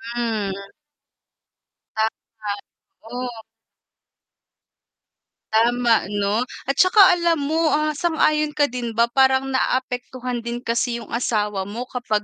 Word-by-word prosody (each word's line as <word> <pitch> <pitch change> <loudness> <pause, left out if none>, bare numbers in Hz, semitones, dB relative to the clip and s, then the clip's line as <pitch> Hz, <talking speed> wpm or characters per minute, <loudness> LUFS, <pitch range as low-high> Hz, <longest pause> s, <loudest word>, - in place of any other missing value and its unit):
Mm. 220 -4 -1 1.4
Tama, 220 -1 -3 0.6
oo. 245 -2 -5 2.1
Tama, 235 -1 +3
'no? 205 +4 0 0.2
Atsaka 370 - +5
alam 340 -1 +2
mo, 320 +2 +1
ah, 305 0 +1
sang-ayon 305 -1 +1
ka 290 -4 +2
din 240 -3 -4
ba 235 +1 +2
parang 265 0 +3
naapektuhan 255 -1 -2
din 235 +1 -5
kasi 235 +1 0
yung - - -15
asawa 210 -5 -1
mo 230 +4 -5
kapag 215 -4 -1
245 Hz, 105 wpm, -22 LUFS, 225-275 Hz, 2.1 s, Atsaka